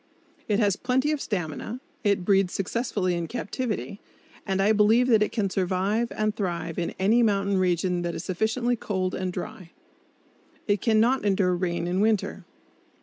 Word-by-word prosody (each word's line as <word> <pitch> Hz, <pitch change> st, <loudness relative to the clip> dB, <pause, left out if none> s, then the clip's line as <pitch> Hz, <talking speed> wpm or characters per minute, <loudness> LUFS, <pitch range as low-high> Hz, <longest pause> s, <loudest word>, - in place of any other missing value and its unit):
It 210 Hz, -, +2 dB
has 205 Hz, -3 st, +2 dB
plenty 260 Hz, +4 st, +1 dB
of 300 Hz, -2 st, -1 dB
stamina, 195 Hz, +4 st, -4 dB, 0.2 s
it 200 Hz, -4 st, +1 dB
breeds 195 Hz, -2 st, +2 dB
successfully 195 Hz, -2 st, -1 dB
in 170 Hz, -1 st, -2 dB
captivity, 225 Hz, -2 st, -4 dB, 0.5 s
and 195 Hz, 0 st, 0 dB
I 200 Hz, +2 st, +4 dB
believe 220 Hz, +3 st, +4 dB
that 220 Hz, -3 st, +5 dB
it 210 Hz, -, +1 dB
can 215 Hz, -4 st, 0 dB
survive 195 Hz, +5 st, 0 dB
and 215 Hz, 0 st, -1 dB
thrive 170 Hz, -5 st, -3 dB
in 170 Hz, -, -3 dB
any 215 Hz, +6 st, +3 dB
mountain 200 Hz, -3 st, +2 dB
region 180 Hz, 0 st, +1 dB
that 175 Hz, -1 st, -3 dB
is -, -, -5 dB
sufficiently 220 Hz, +7 st, 0 dB
cold 190 Hz, -5 st, -2 dB
and 185 Hz, -1 st, -2 dB
dry. 180 Hz, -1 st, -7 dB, 1.0 s
It 205 Hz, -2 st, +1 dB
can 220 Hz, -2 st, +3 dB
not 250 Hz, +4 st, +3 dB
endure 195 Hz, -3 st, +2 dB
rain 175 Hz, -1 st, -2 dB
in 180 Hz, +2 st, -1 dB
winter! 215 Hz, -2 st, 0 dB
200 Hz, 165 wpm, -26 LUFS, 180-220 Hz, 1.0 s, that